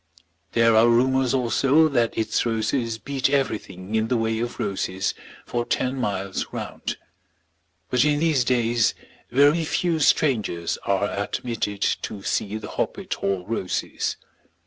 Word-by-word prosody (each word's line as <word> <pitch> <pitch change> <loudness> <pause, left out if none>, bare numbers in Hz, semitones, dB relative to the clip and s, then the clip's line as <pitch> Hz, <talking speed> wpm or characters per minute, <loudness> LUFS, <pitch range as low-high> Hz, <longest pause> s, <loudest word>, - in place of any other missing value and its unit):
There 115 -1 +4
are 110 +2 +6
rumours 130 +2 +3
also 135 +4 +3
that 120 -5 +1
its 110 0 +1
roses 115 +1 -1
beat 135 +2 -1
everything 105 -8 -2
in 110 0 +1
the 125 - +1
way 115 0 0
of 120 +1 -4
roses 95 -1 -1 0.3
for 120 -1 -1
ten 125 +2 -1
miles 100 -6 -2
round. - - -5 0.9
But 125 -1 +4
in 150 -1 +2
these 155 -5 +2
days 120 -2 +2 0.3
very 145 +6 +4
few 165 +1 0
strangers 110 - +1
are - - +1
admitted 105 -4 -3 0.2
to 100 -2 -6
see 105 +2 -1
the 110 - -8
Hoppet - - -3
Hall 95 -2 -2
roses. 105 -4 -2
115 Hz, 135 wpm, -24 LUFS, 110-130 Hz, 0.9 s, are